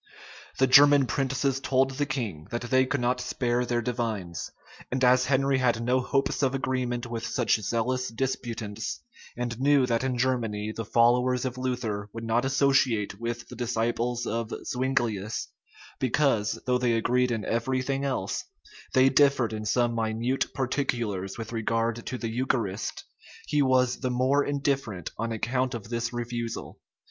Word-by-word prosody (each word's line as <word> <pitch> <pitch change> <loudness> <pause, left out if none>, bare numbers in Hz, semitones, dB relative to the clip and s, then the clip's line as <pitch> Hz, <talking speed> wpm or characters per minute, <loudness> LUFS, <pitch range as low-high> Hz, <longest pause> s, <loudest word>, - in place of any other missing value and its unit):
The 135 - +4
German 145 +1 +7
princes 135 +1 0
told 135 0 +2
the 145 +2 -2
king, 110 - -4
that 120 +1 -3
they 130 0 +4
could 135 0 -1
not 125 +1 +1
spare 125 0 0
their 120 -1 0
divines; 110 -8 -3 0.4
and 130 0 -1
as 125 0 +5
Henry 135 0 +2
had 120 -3 +1
no 125 +2 +2
hopes 135 +3 0
of 135 -1 +2
agreement 125 -2 -1
with 115 -1 -5
such 120 -1 +1
zealous 125 +4 -1
disputants, 115 -3 -3 0.4
and 120 -1 -3
knew 140 -1 +4
that 115 0 0
in 130 -2 -1
Germany 115 -4 -1
the 115 - -4
followers 125 +3 +3
of 130 0 -4
Luther 115 -5 -2
would 115 - -6
not 115 +2 +1
associate 135 -7 +2
with 120 +1 -4
the 125 - -10
disciples 120 0 -1
of 115 +1 -2
Zuinglius, 120 -5 -1 0.5
because, 130 -4 +1
though 125 0 +2
they 120 -2 +2
agreed 125 +2 +2
in 115 -3 -2
every 130 +3 0
thing 135 +1 -1
else, 130 -8 -2 0.5
they 130 0 +6
differed 135 -5 +3
in 110 0 -4
some 120 +2 +2
minute 115 +3 -1
particulars 120 -8 -2
with 115 -1 -6
regard 115 +1 -1
to 130 - -3
the 115 -2 -3
eucharist, 115 -5 -2 0.4
he 150 -1 +1
was 130 -2 +3
the 130 - -1
more 130 +3 +2
indifferent 135 - -2
on 115 0 -2
account 125 +3 -1
of 115 -2 -7
this 120 0 -2
refusal. 120 -1 -5
125 Hz, 155 wpm, -27 LUFS, 115-130 Hz, 0.5 s, German